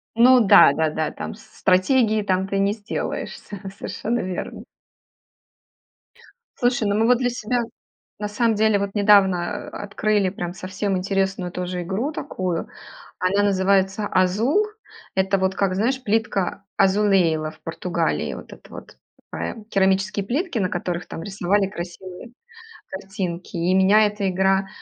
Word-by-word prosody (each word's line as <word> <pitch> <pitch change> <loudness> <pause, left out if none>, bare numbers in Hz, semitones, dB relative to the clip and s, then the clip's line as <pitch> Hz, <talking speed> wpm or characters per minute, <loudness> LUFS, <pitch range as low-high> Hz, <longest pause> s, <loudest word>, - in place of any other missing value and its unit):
Ну 250 +2 +6
да, 165 - +8
да, 160 0 +1
да, 155 0 -2
там - - -7
стратегии, 215 +3 +1
там 190 -1 0
ты 195 0 -2
не 200 +1 +2
сделаешься, 205 -1 -5 0.2
совершенно 235 +4 -3
верно. 185 -1 -5 2.0
Слушай, 245 -3 +1
ну 200 - +1
мы 220 +1 +3
вот 245 0 +4
для 245 -1 0
себя, 245 +1 -1 0.6
на 210 0 -3
самом 225 +2 +1
деле, 215 -1 +3
вот 200 0 -3
недавно 200 -4 +3
открыли 205 0 -1
прям 175 -2 -5
совсем 190 +1 -3
интересную 195 -1 -1
тоже 180 0 -4
игру 200 - -2
такую. 185 - -3 0.5
Она 190 +3 +1
называется 195 +1 +2
"Азул". 220 - +2 0.5
Это 190 +1 +1
вот 190 0 0
как, 190 -1 0
знаешь, 250 +7 0
плитка 205 -3 -1 0.2
Azulejo, 190 -6 +3
в - - -19
Португалии. 170 +2 -2
Вот - - -11
это - - -14
вот - - -11 0.3
такая 220 - -5
керамические 195 0 +1
плитки, 285 - -1
на 185 -3 0
которых 175 -1 -3
там 165 - -7
рисовали 195 +1 0
красивые 185 +3 -9 0.6
картинки. 190 -9 -5
И 175 +2 +1
меня 195 +3 +5
эта 205 -2 -2
игра 190 +1 +1
195 Hz, 140 wpm, -22 LUFS, 185-215 Hz, 2.0 s, да